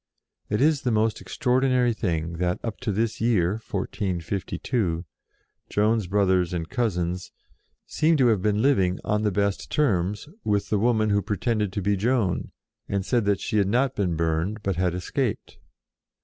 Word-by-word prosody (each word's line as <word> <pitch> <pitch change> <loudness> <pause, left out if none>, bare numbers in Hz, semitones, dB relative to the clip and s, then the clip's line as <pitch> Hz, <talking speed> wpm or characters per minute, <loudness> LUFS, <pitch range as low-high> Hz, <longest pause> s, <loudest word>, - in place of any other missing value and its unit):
It 105 +2 0
is 150 -1 +3
the 125 - 0
most 110 -1 +1
extraordinary 125 -1 +1
thing 85 -5 -2
that, 90 0 0
up 115 -3 -4
to 125 -4 -2
this 110 +2 -1
year, 105 -7 +2
1452, 95 - -2 0.6
Joan's 105 -1 +1
brothers 95 -2 +2
and 80 -1 -3
cousins 90 -7 -2 0.5
seem 160 +1 +2
to 130 - +4
have 105 -5 +2
been 105 +2 +1
living, 95 -10 +3
on 105 0 0
the 105 -1 +1
best 100 +1 -1
terms, 105 -6 0 0.2
with 105 -1 0
the 105 - +2
woman 110 -1 +2
who 100 0 +3
pretended 105 +1 -1
to 100 - -2
be 100 +1 +2
Joan, 110 -2 0 0.4
and 100 -1 -1
said 120 -2 +1
that 100 -1 +2
she 110 - 0
had 100 - +2
not 125 +5 +2
been 90 -5 0
burned, 85 +6 -1
but 95 -2 0
had 90 0 0
escaped. 110 +5 -3
105 Hz, 165 wpm, -25 LUFS, 90-115 Hz, 0.6 s, to